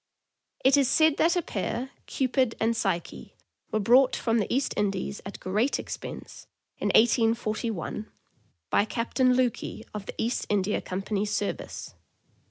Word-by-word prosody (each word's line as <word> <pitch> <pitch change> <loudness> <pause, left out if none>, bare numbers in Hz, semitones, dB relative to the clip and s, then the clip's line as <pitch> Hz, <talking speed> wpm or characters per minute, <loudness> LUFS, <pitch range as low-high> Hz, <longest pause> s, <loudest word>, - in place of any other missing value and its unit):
It 275 +2 +6
is 275 -3 +3
said 315 +1 +4
that 340 +2 +3
a 355 - +1
pair, 245 +5 -3 0.2
Cupid 255 -2 +1
and 230 +1 +1
Psyche, 190 -6 -3 0.4
were 215 - +1
brought 250 +5 +5
from 230 -1 +1
the 205 - -2
East 270 +2 +1
Indies 200 0 -1
at 195 - -8
great 210 +9 0
expense, - - -8 0.3
in - - -1
1841, 225 -3 +1 0.6
by - - +4
Captain 250 +3 +1
Lukey, 245 -3 -1
of 210 -2 -6
the - - -6
East 235 +3 -1
India 205 0 +1
Company' 195 +2 -3
s 210 - -1
service. 205 - -3
225 Hz, 145 wpm, -27 LUFS, 205-255 Hz, 0.6 s, It